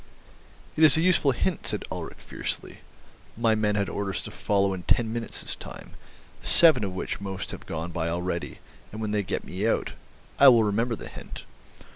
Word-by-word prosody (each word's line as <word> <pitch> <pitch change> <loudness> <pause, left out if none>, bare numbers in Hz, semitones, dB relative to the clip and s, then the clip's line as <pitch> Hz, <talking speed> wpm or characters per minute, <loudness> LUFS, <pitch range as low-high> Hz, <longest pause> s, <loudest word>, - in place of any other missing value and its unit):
"It 160 - +2
is 155 -1 +8
a - - +3
useful 175 -5 +4
hint," 160 +7 -1
said - - -2
Ulrich - - -6
fiercely. - - -5 0.6
"My 115 -1 +3
men 105 -1 +1
had 100 -1 0
orders 100 -1 -3
to - - -5
follow 100 -1 +1
in 95 - -5
ten 110 +5 +1
minutes 115 -1 -3
time, - - -10 0.5
seven 165 -9 +5
of 95 -2 -3
which 95 - -4
must 95 -1 -5
have - - -9
gone 80 +1 -4
by 85 -1 -2
already, 85 +1 -3 0.3
and 110 - -7
when 110 -1 -2
they 105 -1 +1
get 95 - -3
me 95 +5 -2
out—I 140 +4 0
will 120 -4 +8
remember 115 +3 0
the - - -9
hint. - - -9
105 Hz, 180 wpm, -26 LUFS, 95-120 Hz, 0.6 s, is